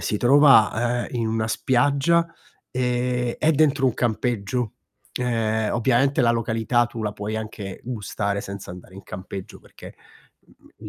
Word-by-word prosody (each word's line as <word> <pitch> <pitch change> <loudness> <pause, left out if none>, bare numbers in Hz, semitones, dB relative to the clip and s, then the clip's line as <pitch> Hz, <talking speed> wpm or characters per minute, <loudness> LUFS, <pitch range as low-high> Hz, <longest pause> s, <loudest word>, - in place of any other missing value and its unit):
si 105 - -1
trova, 120 -3 +4
ehm, - - -11
in 115 - 0
una 110 0 -1
spiaggia, 140 +8 +2 0.4
ehm, 125 -1 -1
è 155 - +3
dentro 145 -2 +3
un 125 - +1
campeggio. 120 0 -1 0.5
Ehm, 110 -3 0
ovviamente 130 +3 +2
la 120 -2 +4
località, 115 +1 +1
tu 115 -1 -7
la 105 -1 -2
puoi 105 +2 -4
anche 105 -3 -6
gustare 100 -4 -3
senza 100 -2 -8
andare 90 +1 -12
in 100 - -10
campeggio, 95 0 -8
perché - - -14 0.8
l - - -10
120 Hz, 145 wpm, -23 LUFS, 110-125 Hz, 0.8 s, trova